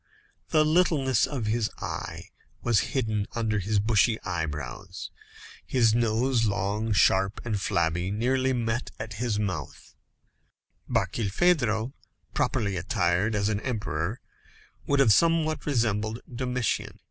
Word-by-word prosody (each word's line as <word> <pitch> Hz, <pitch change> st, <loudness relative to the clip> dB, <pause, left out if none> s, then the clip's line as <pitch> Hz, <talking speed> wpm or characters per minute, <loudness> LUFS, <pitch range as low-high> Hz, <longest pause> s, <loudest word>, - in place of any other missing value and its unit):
The 155 Hz, -1 st, +4 dB
littleness 155 Hz, -7 st, +3 dB
of 130 Hz, -7 st, -3 dB
his 110 Hz, 0 st, 0 dB
eye -, -, -5 dB, 0.4 s
was 120 Hz, -3 st, +3 dB, 0.2 s
hidden 110 Hz, -4 st, 0 dB
under 110 Hz, -2 st, 0 dB
his 105 Hz, +3 st, 0 dB
bushy 110 Hz, +2 st, +3 dB
eyebrows. 75 Hz, -8 st, -5 dB, 0.5 s
His 115 Hz, -4 st, +3 dB
nose, 115 Hz, +2 st, +2 dB
long, 105 Hz, +2 st, -1 dB
sharp, 95 Hz, -1 st, +3 dB
and 105 Hz, -4 st, -1 dB
flabby, 85 Hz, +1 st, 0 dB
nearly 130 Hz, +5 st, +1 dB
met 120 Hz, -1 st, -1 dB, 0.2 s
his 110 Hz, 0 st, -1 dB
mouth. 90 Hz, -9 st, -4 dB, 1.0 s
Barkilphedro, 115 Hz, -, +1 dB, 0.4 s
properly 100 Hz, -4 st, 0 dB
attired, 90 Hz, +3 st, +1 dB
as 100 Hz, -1 st, +1 dB
an 105 Hz, -2 st, 0 dB
emperor, 105 Hz, -, -3 dB, 0.7 s
would 140 Hz, -, +2 dB
have 115 Hz, -6 st, +6 dB
somewhat 165 Hz, 0 st, +2 dB
resembled 110 Hz, -4 st, 0 dB
Domitian. 125 Hz, -1 st, -2 dB
110 Hz, 110 wpm, -27 LUFS, 100-125 Hz, 1.0 s, have